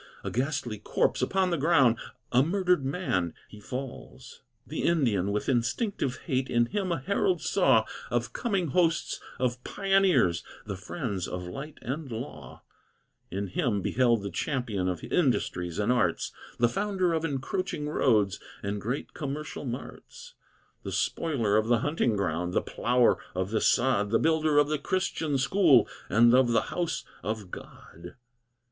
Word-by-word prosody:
A - - -3
ghastly 125 -4 -2
corpse, - - 0
upon 190 -1 +1
the 170 - 0
ground, 135 -7 +4 0.3
A 125 - +5
murdered 180 0 +2
man, 135 - -1
he 105 - -13
falls. 130 +4 -8 0.2
The - - -4
Indian, 115 - +2
with 105 +1 -2
instinctive 130 - 0
hate, 130 -4 0
In 120 0 +3
him 190 - -2
a 170 - +1
herald 180 +4 +1
saw 135 - +3 0.2
Of 120 0 -1
coming 195 - -1
hosts 165 +2 +1 0.2
of 125 0 -1
pioneers, 195 - +2 0.2
The 100 - -4
friends 100 - -4
of 90 0 -5
light 140 - -7
and 135 +2 -4
law; 115 - -7 0.7
In 100 +3 -3
him 105 - 0
beheld 120 -2 +2
the 100 - -4
champion 105 - -1
Of 90 -3 -4
industries 90 - 0
and 105 +3 +1
arts, 125 -1 +1 0.3
The 120 - +4
founder 185 - 0
of 160 -1 0
encroaching 150 +1 -2
roads 105 -9 +2 0.2
And 100 0 -3
great 125 +7 -4
commercial 145 0 -5
marts; 480 - -8 0.5
The - - -6
spoiler 120 -11 0
of 110 0 +1
the 120 -1 +3
hunting 145 -6 +1
ground, 90 -2 -1
The - - +2
plougher 120 +1 +2 0.2
of 95 +2 -2
the 110 - +1
sod, 120 -5 +3
The 115 - +3
builder 155 0 +2
of 145 0 +5
the 150 0 -1
Christian 160 -4 -1
school 140 -1 +4 0.2
And 115 +4 +5
of 125 -2 +4
the 115 - +4
house 170 -3 -2 0.2
of 105 -1 -4
God. 85 +1 -11
125 Hz, 155 wpm, -28 LUFS, 105-160 Hz, 0.7 s, A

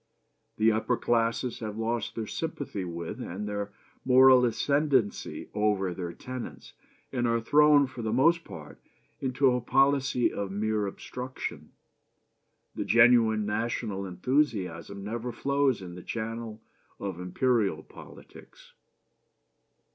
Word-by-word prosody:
"The 110 +1 +4
upper 110 +3 0
classes 115 +1 0
have 110 -2 -5
lost 115 0 -2
their 115 - -3
sympathy 140 - -4
with 85 -1 -6
and 100 +4 -5
their 100 0 -4 0.3
moral 130 0 +7
ascendency 135 -2 0
over 105 -3 +1
their 85 -1 -5
tenants, 125 +6 -8 0.4
and 120 -2 0
are 115 0 +2
thrown 145 +4 +5
for 130 -2 -8
the 110 -1 -2
most 165 +8 +3
part 75 -3 -11 0.4
into 130 0 +2
a 125 0 0
policy 135 0 +2
of 100 -1 -3
mere 105 +1 -1
obstruction. 125 +6 -7 1.0
The - - -3
genuine 115 -2 +5
national 105 -2 -2
enthusiasm 100 - -1
never 115 +4 -4
flows 140 -2 0
in 90 -1 -8
the 90 - -9
channel 115 +1 -5 0.4
of 95 -3 -5
imperial 95 -2 0
politics. - - -15
115 Hz, 120 wpm, -28 LUFS, 100-130 Hz, 1.0 s, moral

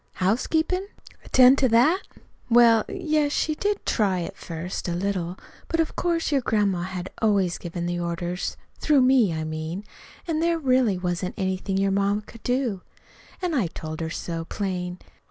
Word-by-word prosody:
"Housekeepin'? 320 - 0 0.4
Attend 255 +1 +6
to 260 - +3
that? 290 - +4 0.5
Well, 230 -2 +6
y - - -5
yes, 305 -2 +2
she 310 - 0
did 410 +6 -2
try 195 -4 +1
to 170 - -3
at - - -12
first, 170 +2 -5
a 170 - -1
little; 180 -1 -2 0.3
but 330 - -1
of 325 - 0
course 335 -2 0
your 280 -2 +2
grandma 205 -6 +1
had 185 0 -5
always 200 -5 +2
given 170 0 -5
the 175 0 -2
orders 175 +1 -3 0.2
through 295 -3 +4
me, 255 -7 +4
I 160 -1 -2
mean; 155 +4 -4 0.4
an' 320 -2 0
there 335 +1 +2
really 255 - +2
wasn't 180 0 -2
anything 190 0 -1
your 195 0 +2
ma 200 +1 +1
could 230 - -14
do. 245 -6 -1 0.6
An' 355 -2 0
I 240 - +1
told 155 -1 -7
her 160 - -2
so, 165 0 -4
plain. 180 -2 -3
200 Hz, 175 wpm, -25 LUFS, 180-265 Hz, 0.6 s, Attend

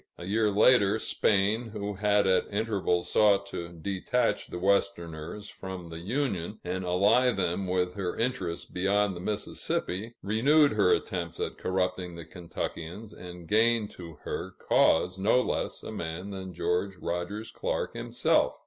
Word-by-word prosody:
A 85 - -8
year 105 +3 +2
later, 105 0 +5
Spain, 110 +2 +1
who 105 -1 -3
had 105 +1 +2
at 95 +2 +2
intervals 100 -4 0
sought 105 -2 +4
to 85 0 -5
detach 95 +8 -1
the - - -6
Westerners 90 -1 -1
from 95 -4 -8
the 80 - -6
Union, 105 - -2
and 90 +1 -3
ally 100 +8 +4
them 95 -3 -1
with 90 0 0
her 90 -2 -3
interests 105 -9 -2
beyond 100 +1 +1
the - - -6
Mississippi, 105 +2 -3
renewed 140 +9 +4
her 105 -4 +3
attempts 85 -2 -1
at - - -3
corrupting 90 -1 -1
the 85 -1 -8
Kentuckians, 90 +4 -6
and 90 -1 -10
gained 110 +1 +3
to 85 -2 -9
her 95 +1 -5
cause 90 +3 +3
no 110 +6 +4
less - - -2
a - - -6
man 85 +4 -5
than 95 -1 -6
George 90 +3 -1
Rogers 90 +6 -4
Clark - - -2
himself. - - +1
95 Hz, 150 wpm, -29 LUFS, 90-105 Hz, -, later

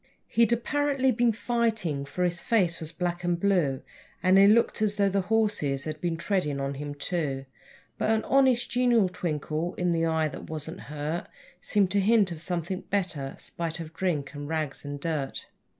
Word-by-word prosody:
He'd 230 -1 +3
apparently 270 +2 +1
been 240 0 +3
fighting, 220 - -1
for 180 +6 -3
his 175 -1 +1
face 180 -7 +2
was 160 -1 -5
black 175 0 -3
and 175 -1 0
blue, 170 -9 +1 0.4
And 185 0 +5
he 200 - +8
looked 220 +1 +3
as 210 -1 +2
though 200 -1 +3
the 195 0 +1
horses 195 -10 0
had 155 -1 -5
been 170 -2 -1
treading 160 -6 -1
on 140 0 -2
him, 145 +1 -6
too; 145 -4 -2 0.5
But - - +1
an 220 0 +2
honest, 260 -3 +3
genial 240 -5 +3
twinkle 160 0 -3
in 180 -1 0
the 165 -1 +1
eye 160 -1 +1
that - - -9
wasn't 160 +1 -6
hurt 150 +3 -3 0.3
Seemed 200 -3 +2
to 205 - +3
hint 205 -1 +4
of 160 -2 -6
something 175 +1 -2
better, 175 -9 -1
spite 165 -1 -4
of 160 -1 -7
drink 160 -6 -2
and 145 0 -6
rags 155 -3 -1
and 145 0 -5
dirt. 145 -3 -3
175 Hz, 180 wpm, -27 LUFS, 155-210 Hz, 0.5 s, he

